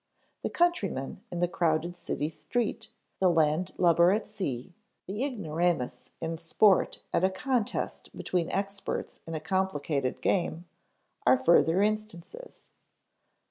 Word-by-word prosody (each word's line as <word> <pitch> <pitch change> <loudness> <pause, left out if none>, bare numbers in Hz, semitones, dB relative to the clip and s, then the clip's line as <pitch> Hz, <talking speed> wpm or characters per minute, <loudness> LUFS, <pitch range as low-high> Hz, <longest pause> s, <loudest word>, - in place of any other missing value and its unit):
The - - -2
countryman 210 - 0
in 175 -1 -3
the 175 - +3
crowded 170 0 0
city 150 -3 -3
street, 225 +7 -2 0.3
the 185 - +4
landlubber 170 +2 +3
at 215 +3 +1
sea, 180 - -4 0.3
the 205 +6 -3
ignoramus 170 - -1
in 165 0 -3
sport 190 +4 +3
at - - +2
a 190 - +5
contest 230 +3 -2
between 175 -2 -1
experts 195 0 -3
in 165 - -4
a - - -2
complicated 155 -6 -1
game, 175 -2 0 0.6
are 130 +1 +7
further 165 +6 +4
instances. 215 - -4
175 Hz, 120 wpm, -29 LUFS, 160-200 Hz, 0.6 s, are